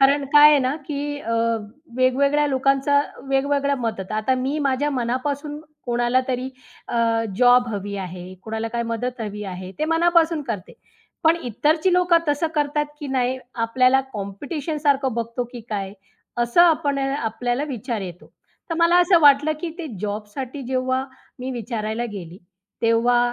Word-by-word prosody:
कारण 275 +1 +4
काय 295 0 +9
आहे 295 - +5
ना, 260 +2 0
की 290 -1 -4
अ, 230 - -4 0.6
वेगवेगळ्या 280 +3 +3
लोकांचा 275 +1 +2 0.3
वेगवेगळं 280 +1 +1
मदत. 220 -5 -3
आता 215 +4 +1
मी 265 +4 -1
माझ्या 280 0 0
मनापासून 280 +4 -2 0.3
कोणाला 240 +1 +2
तरी 255 0 -2 0.4
अ, 230 -1 +1
जॉब 245 -1 +5
हवी 205 -1 -4
आहे, 185 -1 -7
कोणाला 220 +1 -3
काय 235 +1 -2
मदत 235 +2 -3
हवी 210 -1 -5
आहे 185 -1 -6
ते 305 - +1
मनापासून 330 -1 +3
करते. 215 -8 -5 0.5
पण 325 +1 +5
इतरची 310 - +1
लोकं 360 -1 +4
तसं 290 +3 +1
करतात 295 0 0
की 290 - -5
नाही, 260 -1 0 0.2
आपल्याला 255 +3 +3
कॉम्पिटिशनसारखं 280 - -1
बघतो 235 +1 -2
की 245 - -7
काय, 195 -2 -3 0.5
असं 240 +7 +3
आपण 305 -4 +3
आपल्याला 245 -1 -1
विचार 240 -3 -3
येतो. 180 0 -10 0.4
तर 330 - 0
मला 335 +1 +5
असं 355 -1 +5
वाटलं, 290 +1 +6
की 345 - -3
ते 335 - -4
जॉबसाठी 215 +6 -5
जेव्हा 255 +1 -1 0.4
मी 255 +1 -4
विचारायला 225 -1 -3
गेली, 180 -3 -8 0.4
तेव्हा 230 +1 +3
255 Hz, 145 wpm, -22 LUFS, 230-290 Hz, 0.6 s, काय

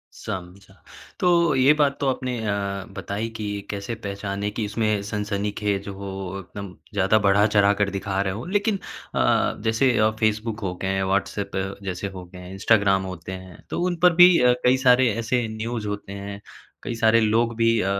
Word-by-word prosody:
समझा। 95 -1 -8 0.5
तो 170 -3 +3
ये 130 +2 +5
बात 145 -2 +2
तो 140 - 0
आपने 125 -1 -3
अ, 100 -2 -2
बताई 105 +3 -3
कि 110 - -4 0.2
कैसे 100 +3 -4
पहचानें 100 -1 -4
कि 110 0 -2
इसमें 105 -1 0
सनसनीखेज़ 105 -1 -2
हो 100 0 -6 0.3
एकदम 100 +1 -8 0.2
ज़्यादा 100 +2 +3
बढ़ा-चढ़ाकर 100 0 +3
दिखा 95 0 -2
रहे 95 -1 -1
हों, 115 - -6
लेकिन 205 0 +1 0.4
अ - - 0
अ, - - +2
जैसे 115 +4 +3
अ, 110 0 +4
फेसबुक 110 +1 0
हो 95 -4 -3
गए 95 - -1
हैं, 95 0 0
व्हाट्सएप 100 +1 -1 0.3
जैसे 95 0 -4
हो 95 -2 -9
गए 90 +1 -13
हैं, 90 +1 -10
इंस्टाग्राम 95 -1 +3
होते 95 -1 -7
हैं, 95 -2 -10
तो - - -2
उन 180 -1 -1
पर 180 -1 +7
भी 180 0 +8
अ, 125 0 +5
कई 125 +1 +5
सारे 125 0 +6
ऐसे 115 +1 0
न्यूज़ 115 0 -3
होते 100 -1 -5
हैं, 100 0 -7 0.4
कई 120 - -4
सारे 115 0 +4
लोग 115 +2 +2
भी 115 -1 +3
अ, 95 - 0
105 Hz, 180 wpm, -24 LUFS, 100-115 Hz, 0.5 s, भी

